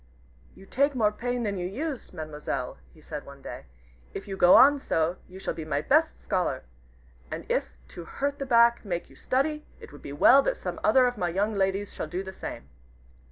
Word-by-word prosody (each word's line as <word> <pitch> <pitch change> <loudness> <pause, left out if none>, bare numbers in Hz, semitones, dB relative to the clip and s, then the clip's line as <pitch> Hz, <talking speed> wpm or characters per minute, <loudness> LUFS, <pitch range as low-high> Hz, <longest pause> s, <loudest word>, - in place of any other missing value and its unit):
"You 195 - -14
take 280 +6 +1
more 215 -4 +3
pain 245 +2 -3
than 200 -3 -2
you 175 - -2
used, 270 - -5
Mademoiselle," 150 -6 -5
he 155 - -19
said 150 -1 -7
one 140 0 -13
day; - - -8 0.5
"if 195 - -6
you 195 - -4
go 180 -1 +6
on 285 +2 +7
so, 165 -7 0
you 185 - -12
shall 190 - -3
be 160 - -6
my 150 -2 -1
best 310 - +2
scholar. 175 -8 -1 0.7
And - - -6
if 60 0 -2
to 170 - -9
hurt 280 - -3
the 275 - -4
back 235 -1 +5
make 175 -5 -4
you - - -16
study, 300 +4 -1 0.2
it - - -12
would 145 - -13
be 140 - -8
well 245 - +6
that - - -1
some - - -5
other 260 -1 +5
of 245 0 -1
my 175 - 0
young 200 +5 0
ladies 195 0 -1
shall - - -4
do 180 +2 -4
the 190 0 -8
same." - - -7
195 Hz, 210 wpm, -27 LUFS, 170-255 Hz, 0.7 s, on